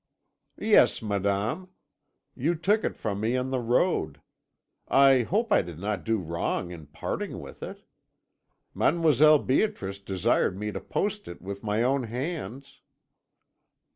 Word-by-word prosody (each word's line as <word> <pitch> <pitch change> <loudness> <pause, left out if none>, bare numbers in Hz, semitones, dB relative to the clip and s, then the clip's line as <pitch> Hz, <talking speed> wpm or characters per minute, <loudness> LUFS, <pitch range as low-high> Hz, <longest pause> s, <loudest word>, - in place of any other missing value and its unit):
"'Yes, 210 - +4
madame; 100 - -1 0.7
you 160 +7 0
took 205 +7 +1
it - - -2
from 100 -3 -3
me 115 +4 0
on 130 +1 -2
the 130 - 0
road. 115 - +1 0.7
I 135 -1 +5
hope 210 - 0
I - - +5
did 85 -3 -9
not 100 +1 -3
do 115 0 +1
wrong 85 0 -3
in 80 -4 -10
parting 80 +3 -4
with - - -11
it. - - -8 0.9
Mademoiselle 155 -2 +5
Beatrice 130 - -1
desired 95 -1 0
me 105 +1 -3
to - - -5
post 205 +1 -2
it 85 - -8
with 100 +1 -7
my 105 +2 0
own 130 0 +1
hands.' 135 +2 -6
120 Hz, 140 wpm, -27 LUFS, 100-155 Hz, 0.9 s, I